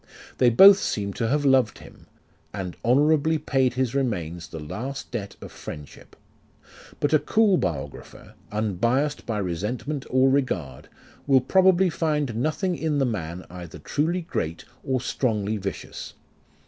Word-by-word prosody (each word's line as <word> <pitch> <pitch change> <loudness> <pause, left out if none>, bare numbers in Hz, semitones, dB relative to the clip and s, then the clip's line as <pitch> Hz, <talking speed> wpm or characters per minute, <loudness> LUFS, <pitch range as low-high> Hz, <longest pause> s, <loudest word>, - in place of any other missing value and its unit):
They 125 - +6
both 195 - +8
seem 100 -2 -2
to 115 - -1
have 145 +3 0
loved 130 -5 +3
him, - - -15 0.5
and 95 -3 -5
honourably 150 +5 +3
paid 135 -4 0
his 130 -2 0
remains 90 - -2
the 80 - -8
last 120 - -6
debt 105 -5 -5
of - - -9
friend 75 -1 -8
ship. - - -17 0.8
But 145 - 0
a 155 - +6
cool 215 +1 +3
biographer, 80 - -5 0.2
unbiassed 115 +8 0
by 110 - -1
resentment 105 - -3
or 130 +1 +4
regard, 85 - -2 0.4
will 135 -2 +6
probably 185 +6 +4
find 150 -7 -1
nothing 155 - -1
in 160 -2 -1
the 135 - +2
man 90 -6 -4
either 90 -2 -9
truly 170 +5 -1
great, 85 - -4 0.2
or 130 -1 0
strongly 110 -5 -1
vicious. 100 -3 -6
130 Hz, 145 wpm, -25 LUFS, 100-150 Hz, 0.8 s, both